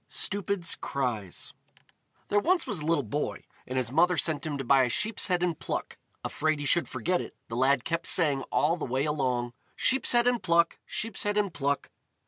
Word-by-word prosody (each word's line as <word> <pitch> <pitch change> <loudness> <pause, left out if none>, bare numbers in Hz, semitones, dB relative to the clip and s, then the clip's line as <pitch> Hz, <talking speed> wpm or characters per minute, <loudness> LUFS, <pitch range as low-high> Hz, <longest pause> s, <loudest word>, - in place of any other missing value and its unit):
Stupid's 200 -3 -1
Cries 115 -9 -4 0.8
There 205 - +4
was 350 - +2
once 190 -7 -3
a - - -4
little 160 -2 +1
boy, 145 +7 -3 0.2
and 130 - -3
his 125 -2 -1
mother 175 +4 +3
sent 155 -1 0
him 145 -2 -2
to 135 - -4
buy 135 +1 +5
a 125 - +2
sheep's 215 - 0
head 180 -2 +1
and 170 -3 -1
pluck; - - -4 0.3
afraid 155 0 0
he 145 - -5
should 175 +4 +3
forget 180 0 0
it, - - -9
the 115 - -4
lad 130 +1 +3
kept 170 0 -2
saying 145 -6 +3
all 165 +4 +2
the - - -6
way 130 +3 0
along: 125 -5 -1 0.2
"Sheep's 265 0 +2
head 240 0 +4
and 245 -1 +2
pluck! 170 -1 +2
Sheep's 225 -2 -2
head 205 0 0
and 200 -4 +1
pluck!" 140 -1 -1
155 Hz, 200 wpm, -28 LUFS, 135-185 Hz, 0.8 s, buy